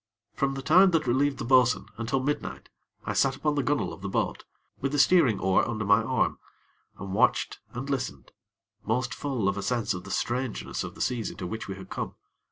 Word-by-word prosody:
From 135 0 0
the 135 - -5
time 185 +7 +6
that 165 -3 +2
I 125 - -3
relieved 135 +2 +2
the 135 - -4
bo'sun, 125 -1 +4
until 125 +3 -1
midnight, 145 +2 -3 0.4
I - - -1
sat 135 -1 +2
upon 150 +2 0
the 145 - +1
gunnel 140 +2 0
of - - -11
the 100 - -4
boat, - - -1 0.3
with 135 +1 -2
the - - +1
steering 140 - +5
oar 95 0 +3
under 110 -2 -2
my 100 +2 +5
arm, 130 +3 0 0.6
and 95 -1 -6
watched - - +2 0.2
and 130 +3 -4
listened, 135 -2 -3 0.5
most 120 +2 -1
full 130 -9 -2
of 100 0 0
a - - -3
sense 120 0 0
of 90 0 -6
the 100 - -10
strangeness 120 +2 -2
of - - -7
the - - -8
seas 120 -3 -1
into 95 - -7
which 110 +5 -5
we 95 - -5
had 95 -1 -11
come. - - -4
125 Hz, 215 wpm, -27 LUFS, 110-140 Hz, 0.6 s, time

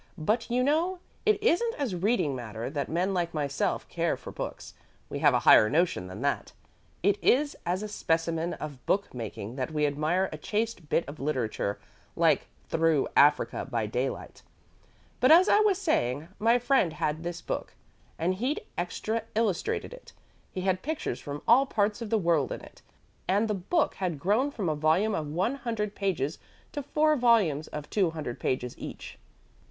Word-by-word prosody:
"But, 215 +10 0
you 250 +1 +2
know, 325 +7 +1 0.3
it 430 -1 +5
isn't 460 +3 +2
as 270 -9 -2
reading 180 - +1
matter 115 0 -5
that 145 -2 -3
men 180 +4 0
like 170 -2 -1
myself 145 -2 -1
care - - -1
for - - -9
books. - - -6 0.4
We - - -4
have - - +5
a - - +2
higher 110 - +7
notion 155 - +1
than 95 +4 -8
that. 140 +1 -1 0.5
It 200 +1 +2
is 285 +3 +3
as 185 +4 0
a - - -3
specimen 165 -3 -1
of 145 -4 -8
book 200 +1 0
making 115 0 -6
that 130 - -2
we 150 -1 0
admire 155 +6 +1
a 155 - -6
chaste 215 -5 -2
bit 170 - +1
of 145 +2 -8
literature 125 -8 -1 0.4
like - - +3 0.2
Through 165 -3 +2
Africa 145 -1 +4
by 115 -4 -1
Daylight. 125 +5 -3 0.8
But, 255 - +5
as 350 +4 +8
I 415 - +5
was 420 -3 +3
saying, 160 - 0
my 230 +3 +4
friend 245 - +2
had 155 0 -2
this 175 0 -4
book, - - -4 0.4
and 175 +3 +1
he'd 250 +10 -1 0.2
extra 220 +6 -2
illustrated 220 - 0
it. - - -13 0.4
He 185 - -5
had 185 0 0
pictures 310 +1 -3
from 145 0 -7
all 265 +4 +6
parts 210 -1 0
of 230 - -4
the 225 - +3
world 165 -7 +1
in - - -4
it, - - -15 0.5
and 205 +4 +2
the 210 - 0
book 210 - 0
had 180 -5 -2
grown 210 - +1
from 215 -10 -4
a 155 - +2
volume 160 +8 +2
of 155 -5 -2
one 185 - -1
hundred 225 -5 -3
pages 170 -8 -2 0.3
to 290 - -4
four 305 +2 +2
volumes 220 - +3
of 150 -1 -7
two 195 -5 +2
hundred 155 -7 -5
pages 125 -1 -2
each." - - -8
180 Hz, 180 wpm, -28 LUFS, 150-230 Hz, 0.8 s, as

